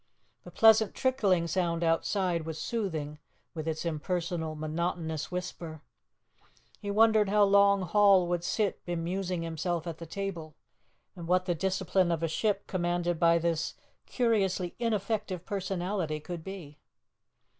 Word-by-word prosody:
The - - -10
pleasant 220 -1 +5
trickling 205 -10 +2
sound 170 0 0
outside 170 +1 +1
was 160 0 -5
soothing, 160 -9 -3 0.3
with 160 -1 -5
its 160 +1 -2
impersonal, 165 0 -2
monotonous 160 0 -3
whisper. 170 -3 -6 1.0
He 205 - -6
wondered 215 0 +4
how 210 +1 +4
long 200 -1 +5
Hall 195 0 +5
would 175 -1 -1
sit 205 +1 -1
bemusing 175 +1 -2
himself 165 +1 -2
at 165 -2 -6
the 165 - -8
table, 170 -4 -5 0.6
and 170 -2 -8
what 185 +1 +2
the 180 - +1
discipline 185 +1 +1
of 165 -1 -1
a - - +2
ship 200 +5 -1
commanded 175 -2 -1
by 170 -1 +5
this 165 -1 -1 0.3
curiously 195 -7 0
ineffective 210 -5 -2
personality 185 -5 -2
could 170 +2 -7
be. 165 -6 -9
175 Hz, 135 wpm, -29 LUFS, 165-195 Hz, 1.0 s, pleasant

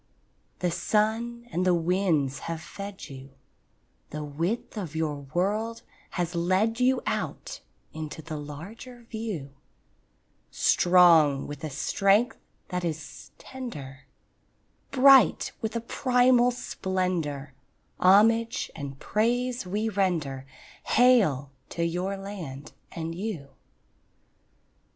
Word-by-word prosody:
The 180 -1 +1
sun 220 +6 0
and 180 - 0
the 180 -1 +4
winds 165 -6 +1
have 165 -1 -3
fed 200 +4 -8
you; 135 0 -11 0.7
The 150 0 -5
width 165 +13 -3
of 175 -7 -5
your 150 -3 -2
world 215 +5 -1 0.3
has 175 0 -1
led 185 +7 +1
you 255 0 +2
Out - - -3 0.3
into 155 0 -6
the 160 0 -6
larger 195 - -9
view; 205 - -5 1.0
Strong 170 -6 +5
with 145 -1 -8
a 155 - -3
strength 195 - +2 0.3
that 180 -1 -2
is 160 -2 -5
tender, 145 - -8 0.8
Bright 270 -1 +6
with 220 -1 -3
a 230 - -1
primal 250 0 +3
splendour, 180 - -2 0.5
Homage 225 +5 +4
and 140 -2 -6
praise 240 +1 0
we 210 +4 -1
render— 165 -10 -1 0.4
Hail 200 - +4 0.2
to 170 - -1
your 180 +4 -2
land 170 -9 -8 0.2
and 165 -1 -4
you! 175 -6 -5
180 Hz, 105 wpm, -27 LUFS, 155-225 Hz, 1.0 s, Bright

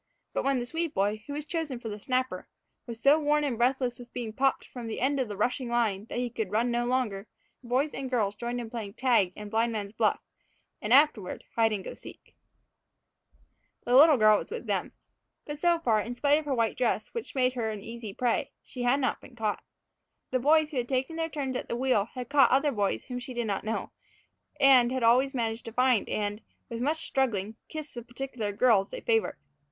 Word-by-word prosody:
But - - -1
when 275 -1 +2
the 240 - -2
Swede 325 +4 -3
boy, 205 +2 0
who 285 - -5
was 295 0 -4
chosen 305 -7 -3
for 235 - -7
the 210 -1 -5
snapper, 255 +4 -1 0.4
was 230 -1 -7
so 280 +6 +5
worn 300 0 +2
and 275 -5 0
breathless 250 +1 0
with 245 0 -12
being 230 -3 -4
popped 270 +3 +1
from 245 -3 -8
the 225 - -4
end 275 +3 +1
of 255 - 0
the 205 -2 -6
rushing 245 +3 -1
line 220 -4 0
that 230 - -6
he 245 -1 -1
could 220 -4 -3
run 230 +4 +1
no 240 0 0
longer, 225 -5 -1 0.4
boys 255 +5 0
and 270 -1 -4
girls 215 -6 +1
had 205 - -29
joined 240 +1 -3
in 230 -2 -6
playing 215 -4 -6
tag 235 -8 +3
and 210 -1 -8
blindman's 220 -3 -1
buff - - +1 0.6
and, 210 - -3
afterward, 255 -8 +3
hide 225 -1 +3
and 200 -3 -2
go - - -6
seek. - - -14 1.5
The 245 - 0
little 300 +1 +8
girl 215 -2 +6
was - - -8
with 470 +2 -6
them. - - -1 0.6
But, 295 0 -6
so 345 +1 +3
far, 225 -9 +2
in 240 +3 -5
spite 290 +3 +3
of 310 - -8
her 280 -2 0
white 230 -2 +1
dress, 235 -3 0
which 465 -9 -6
made 255 -1 +2
her 235 -3 -2
an 210 -2 -6
easy 230 -2 -7
prey, 240 +3 0
she 250 - -8
had 245 +3 +3
not 255 - -1
been 250 - -15
caught. 215 -3 -2 0.7
The 255 - +1
boys 305 +4 +3
who 285 - -4
had 245 -1 -1
taken 265 +4 -1
their 325 0 -2
turns 275 -4 -3
at - - -4
the 235 - -2
wheel 250 -5 +2
had 250 -2 -5
caught 280 0 +5
other 275 +3 +3
boys 205 -5 -1
whom 250 -1 -5
she 250 0 -7
did 240 -1 -1
not 200 -2 -2
know; 220 +1 -3 0.7
and 260 -3 +6
had 260 -2 -1
always 255 +4 +4
managed 225 -1 -2
to 230 - -6
find 250 -2 +2
and, 205 0 -2 0.3
with 230 0 -5
much 310 +5 0
struggling, 220 -6 -1
kiss 310 -2 -7
the 240 - -6
particular 240 -3 -5
girls 205 -2 +3
they - - -7
favored. 225 -1 +1
245 Hz, 220 wpm, -28 LUFS, 225-270 Hz, 1.5 s, little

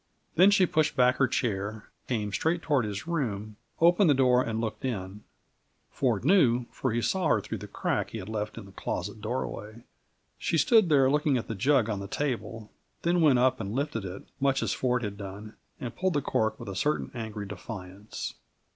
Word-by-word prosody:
Then 185 +4 +6
she 200 -2 +5
pushed 155 -3 +1
back 125 -1 +4
her 135 - +4
chair, 105 -2 -2 0.2
came 105 -5 -2
straight 165 +6 0
toward 140 -6 +2
his 100 +2 -4
room, 110 -11 -3 0.2
opened 175 +2 +5
the 145 - +5
door, 125 -1 +4
and 115 -3 -2
looked 115 +3 -4
in; 105 -5 -4 0.7
Ford 120 -4 0
knew, 130 -9 +4
for 130 - -2
he 115 +1 0
saw 180 - +1
her - - +3
through - - -5
the - - -8
crack - - -1
he - - -6
had 95 -3 -7
left 105 0 -4
in 115 - -7
the 100 - -14
closet 105 +2 -4
doorway. 110 -1 -4 0.6
She 165 - 0
stood 210 - +5
there 140 -3 +5
looking 150 -2 +2
at 115 - -4
the 115 - -3
jug 125 +2 +3
on 105 -3 -2
the 100 - -6
table, 115 -4 -3 0.3
then 175 +1 +2
went 145 -5 +5
up 130 +1 +3
and 105 0 -4
lifted 140 -6 -2
it, 95 0 -7 0.2
much 135 -1 +2
as - - 0
Ford 125 -1 0
had 100 -1 -4
done, 100 +2 -8 0.2
and 120 -2 -6
pulled 185 +4 0
the 145 - +1
cork 110 0 0
with - - -7
a 95 - -5
certain 150 +9 0
angry 110 -3 -5
defiance. 100 0 -7
120 Hz, 200 wpm, -28 LUFS, 105-145 Hz, 0.7 s, Then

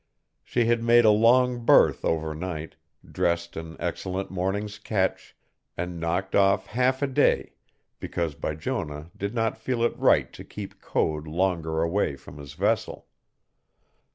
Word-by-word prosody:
She 120 -1 0
had 115 0 +2
made 120 0 +5
a 110 - +7
long 120 +3 +4
berth - - +5
overnight, 80 +1 -3 0.3
dressed 85 0 -1
an 80 0 -7
excellent 95 +1 -3
morning's 100 +3 -2
catch, 100 -3 -2 0.4
and 90 0 -4
knocked 90 +4 -2
off 95 -1 +3
half 130 +4 0
a - - +2
day 135 - +2 0.5
because 85 -3 -3
Bijonah 75 +1 -4
did 100 +4 -4
not 115 -1 0
feel 115 +1 -1
it 120 - +1
right - - +3
to - - -10
keep - - -9
Code 75 0 -1
longer 80 -1 0
away 85 -3 0
from 70 +1 -13
his 70 0 -10
vessel. - - -1
95 Hz, 140 wpm, -26 LUFS, 80-115 Hz, 0.5 s, a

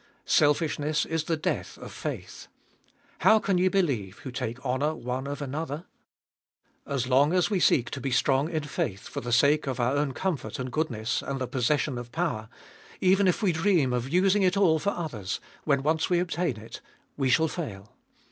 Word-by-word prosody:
Selfishness 150 0 +2
is 160 -1 -2
the 165 - 0
death 155 - -3
of - - -9
faith. - - -6 0.7
How 220 - +6
can 195 -3 +1
ye 185 - +3
believe 135 - 0
who 135 0 -8
take 120 0 -4
honour 140 +5 0
one 130 0 -4
of 145 +1 -4
another 150 +3 -4 1.0
f - - -10
As 130 -3 0
long 140 +5 +4
as 185 +3 +2
we 195 - +2
seek 125 -7 +3
to 135 - -5
be 135 - -2
strong 135 +3 +2
in 160 -3 -2
faith, 105 -9 -3
for - - -5
the 120 - -5
sake 145 +5 +4
of 130 -1 -2
our 125 +3 +1
own 145 -2 0
comfort 185 -3 -3
and 125 -1 -4
goodness, 120 -7 -1
and 135 -1 -4
the 130 - -1
possession 130 +1 0
of 120 -1 -9
power, 110 -2 -2 0.5
even 190 +1 +4
if 185 +5 +1
we 190 - +4
dream 160 -6 +2
of 125 +1 -2
using 190 +5 +3
it 185 +1 +2
all 165 -5 +4
for 200 - 0
others, 125 - -4 0.3
when 140 -3 +2
once 160 +3 +1
we 175 - +3
obtain 170 -6 -1
it, 110 +1 -10 0.3
we 135 -2 0
shall 160 +5 +4
fail. 110 - -6
145 Hz, 195 wpm, -27 LUFS, 125-170 Hz, 1.0 s, How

